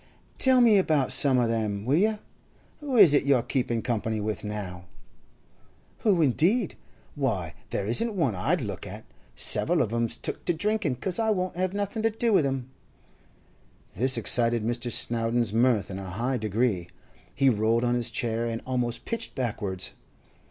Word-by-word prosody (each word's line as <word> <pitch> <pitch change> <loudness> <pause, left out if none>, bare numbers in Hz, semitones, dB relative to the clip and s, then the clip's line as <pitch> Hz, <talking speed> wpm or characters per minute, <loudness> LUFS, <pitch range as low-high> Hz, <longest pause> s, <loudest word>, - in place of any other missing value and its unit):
'Tell 260 -1 +5
me 220 -4 +5
about 150 -8 +1
some 135 0 +4
o' 120 -2 +2
them, 110 -3 -2
will 135 +4 +2
you? 215 +5 +2 0.6
Who 285 -5 -3
is 185 -9 +8
it 145 - +4
you're 135 -4 +2
keeping 120 -3 -2
company 110 -2 -2
with 105 0 -4
now?' 100 -4 -6 1.1
'Who, 190 -7 +2
indeed? 175 - +2 0.4
Why, 105 - -2 0.2
there 100 - -3
isn't 215 - 0
one 155 - 0
I'd 140 - -1
look 100 -3 -6
at! 105 +3 -10 0.3
Several - - +2
of 110 - 0
'em's 115 0 0
took - - -5
to 175 - +1
drinking 205 -5 -1
'cause 180 - -1
I 220 -1 +1
won't 185 -4 -1
have 185 +1 -2
nothing 205 +2 -3
to 225 - +2
do 225 +1 0
with 165 -8 +3
'em.' 130 -1 -4 1.2
This 130 +4 +4
excited 115 0 +3
Mr. 120 +1 -2
Snowdon's 115 -1 +1
mirth 115 -5 +1
in 95 - -6
a 95 -1 -7
high 120 +8 -2
degree; 105 -4 -1 0.5
he 135 - +2
rolled 115 0 +2
on 120 0 +1
his 120 -1 0
chair, 115 -1 -2
and 115 0 -4
almost 125 -2 -2
pitched 230 -2 -4
backwards. 105 -7 -3
120 Hz, 170 wpm, -26 LUFS, 110-170 Hz, 1.2 s, is